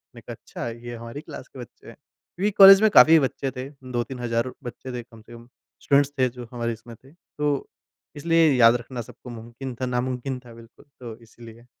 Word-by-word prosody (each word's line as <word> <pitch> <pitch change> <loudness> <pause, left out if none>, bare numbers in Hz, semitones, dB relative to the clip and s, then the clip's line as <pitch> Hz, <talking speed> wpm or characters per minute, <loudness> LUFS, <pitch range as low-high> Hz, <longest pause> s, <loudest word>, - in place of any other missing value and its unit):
मैं - - -12
कहा - - -6
अच्छा, - - -8
ये 120 +1 -8
हमारी 115 +5 -8
क्लास - - -10
के 130 - -14
बच्चे 120 - -13
हैं। - - -12
क्योंकि 200 +4 -6
कॉलेज 195 0 +10
में 220 - +5
काफ़ी 160 -2 +8
बच्चे 135 -1 -2
थे 130 +1 -7 0.2
2-3000 120 +1 -4
हज़ार 120 +1 -2
बच्चे 125 +1 -8
थे। 120 -1 -5
कम 115 -1 -17
से 115 - -16
कम 120 0 -13 0.3
स्टूडेंट्स 140 0 +2
थे 130 -1 +3
जो 120 -1 -10
हमारी 115 -1 -3
इसमें 115 +1 -12
थे। 130 +4 -21
तो 150 -4 -4 0.5
इसलिए 165 +1 +3
याद 120 -2 +6
रखना 120 +1 -6
सबको 120 +2 -13
मुमकिन 120 +3 -8
था 130 - -4
नामुमकिन 125 +1 -3
था, 120 -2 -15
बिल्कुल। 115 +3 -17
तो 120 -3 -8
इसलिए। 115 0 -15
125 Hz, 205 wpm, -24 LUFS, 115-135 Hz, 0.5 s, कॉलेज